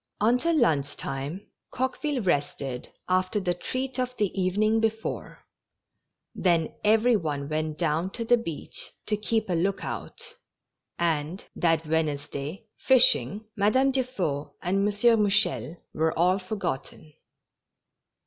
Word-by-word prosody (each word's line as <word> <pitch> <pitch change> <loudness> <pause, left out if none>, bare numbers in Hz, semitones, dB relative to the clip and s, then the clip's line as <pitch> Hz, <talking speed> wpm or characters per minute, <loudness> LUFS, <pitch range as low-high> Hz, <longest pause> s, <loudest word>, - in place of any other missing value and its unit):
Until 250 +10 +3
lunch 145 - +2
time 140 +8 -5 0.2
Coqueville 260 +1 -2
rested 140 -6 -1 0.2
after 185 +3 +1
the 180 -3 0
treat 255 +8 -4
of 250 0 -2
the 205 -2 +1
evening 205 +4 +1
before; 220 0 -3 0.9
then 170 -4 +1
every 225 +3 +4
one 145 -7 -2
went 155 0 -2
down 165 +2 0
to 230 - -4
the 240 - +5
beach 170 -10 -5
ta 210 - 0
keep 220 0 0
a 185 - -1
look 185 +4 0
out, - - -7 0.6
and, 165 +1 -1
that 165 -1 +2
Wednesday, 150 0 -2
fishing, 215 - +4
Madame 260 +7 +3
Dufeu 200 - -2
and 180 +3 +1
M. 200 - +2
Mouchel 205 - +2 0.2
were 160 +1 0
all 180 +3 +3
forgotten. 185 -6 -5
185 Hz, 120 wpm, -27 LUFS, 155-220 Hz, 0.9 s, the